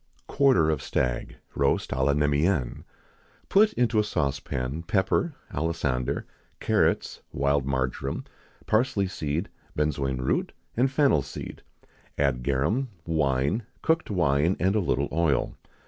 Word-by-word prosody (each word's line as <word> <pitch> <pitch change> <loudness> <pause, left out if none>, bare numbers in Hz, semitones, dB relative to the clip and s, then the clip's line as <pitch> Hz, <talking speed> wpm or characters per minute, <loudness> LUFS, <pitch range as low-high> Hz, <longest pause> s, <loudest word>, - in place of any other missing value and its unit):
[XIX - - -38
53] - - -10
Quarter 130 - +5
of 75 -3 -1
Stag, 60 -2 -1 0.2
roast 70 0 +1
à 65 0 0
la 70 +1 +3
Neméenne. 75 -1 +1 0.6
Put 215 +2 +5
into 120 -3 +2
a - - +4
saucepan 70 -5 -2
pepper, 100 - 0 0.2
alisander, 70 -5 -1 0.4
carrots, - - +1
wild 70 0 +1
marjoram, 65 0 -2 0.4
parsley 110 -3 +2
seed, 85 0 -2 0.3
benzoin 70 -3 0
root, 65 - 0 0.2
and 130 +3 +3
fennel 140 - +3
seed; 70 - -8 0.6
add 70 -4 +1
garum, 70 - 0 0.2
wine, 75 - +1 0.2
cooked 160 0 +1
wine, 85 -2 +2
and 95 +3 +2
a - - +3
little 70 -7 0
oil. 80 -4 +1
75 Hz, 130 wpm, -26 LUFS, 70-100 Hz, 0.6 s, Quarter